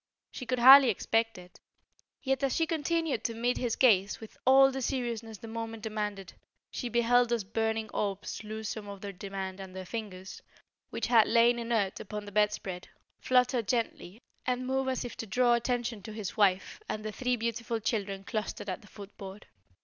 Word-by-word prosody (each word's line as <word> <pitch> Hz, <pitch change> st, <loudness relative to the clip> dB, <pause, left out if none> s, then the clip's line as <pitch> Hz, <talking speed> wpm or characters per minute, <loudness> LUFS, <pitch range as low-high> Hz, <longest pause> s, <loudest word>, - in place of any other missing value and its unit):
She 255 Hz, -, -8 dB
could 255 Hz, -, 0 dB
hardly 265 Hz, +2 st, +9 dB
expect 225 Hz, +1 st, 0 dB
it. 180 Hz, 0 st, -14 dB, 0.6 s
Yet 270 Hz, -1 st, 0 dB
as 275 Hz, -2 st, +1 dB
she 330 Hz, -, +2 dB
continued 325 Hz, -4 st, -1 dB
to 230 Hz, -, -1 dB
meet 240 Hz, +2 st, 0 dB
his 240 Hz, -3 st, -1 dB
gaze 205 Hz, -6 st, +3 dB
with 220 Hz, -, -11 dB
all 270 Hz, +1 st, +7 dB
the 265 Hz, 0 st, -4 dB
seriousness 235 Hz, -4 st, -3 dB
the 225 Hz, -, -10 dB
moment 225 Hz, -1 st, -6 dB
demanded, 210 Hz, -3 st, -4 dB, 0.4 s
she 245 Hz, -, -4 dB
beheld 240 Hz, +1 st, +3 dB
those 235 Hz, -3 st, 0 dB
burning 220 Hz, +2 st, -1 dB
orbs 200 Hz, 0 st, -3 dB
lose 215 Hz, 0 st, -5 dB
some 210 Hz, -1 st, -5 dB
of 200 Hz, -1 st, -8 dB
their 200 Hz, -, -5 dB
demand 195 Hz, 0 st, -6 dB
and 190 Hz, -1 st, -9 dB
the 190 Hz, 0 st, -6 dB
fingers, 195 Hz, -3 st, -7 dB, 0.5 s
which -, -, -3 dB
had 230 Hz, -3 st, +5 dB
lain 235 Hz, +1 st, +4 dB
inert 230 Hz, -5 st, -1 dB
upon 210 Hz, +1 st, -6 dB
the 205 Hz, -, -9 dB
bedspread, 205 Hz, -3 st, -1 dB, 0.3 s
flutter 250 Hz, -1 st, +3 dB
gently 225 Hz, -3 st, -3 dB, 0.2 s
and 250 Hz, 0 st, -1 dB
move 265 Hz, +1 st, 0 dB
as 260 Hz, -1 st, -2 dB
if 240 Hz, -, -7 dB
to 225 Hz, -, -5 dB
draw 245 Hz, +4 st, +3 dB
attention 240 Hz, -2 st, -1 dB
to 215 Hz, +3 st, -8 dB
his 215 Hz, -3 st, -5 dB
wife 195 Hz, -3 st, +2 dB
and 215 Hz, 0 st, -4 dB
the 215 Hz, -, -3 dB
three 250 Hz, +3 st, 0 dB
beautiful 230 Hz, 0 st, -2 dB
children 200 Hz, -3 st, -2 dB
clustered 210 Hz, -1 st, -4 dB
at 185 Hz, -, -4 dB
the 210 Hz, -, -17 dB
foot 205 Hz, -1 st, -12 dB
board. 195 Hz, +1 st, -9 dB
225 Hz, 190 wpm, -30 LUFS, 205-245 Hz, 0.6 s, hardly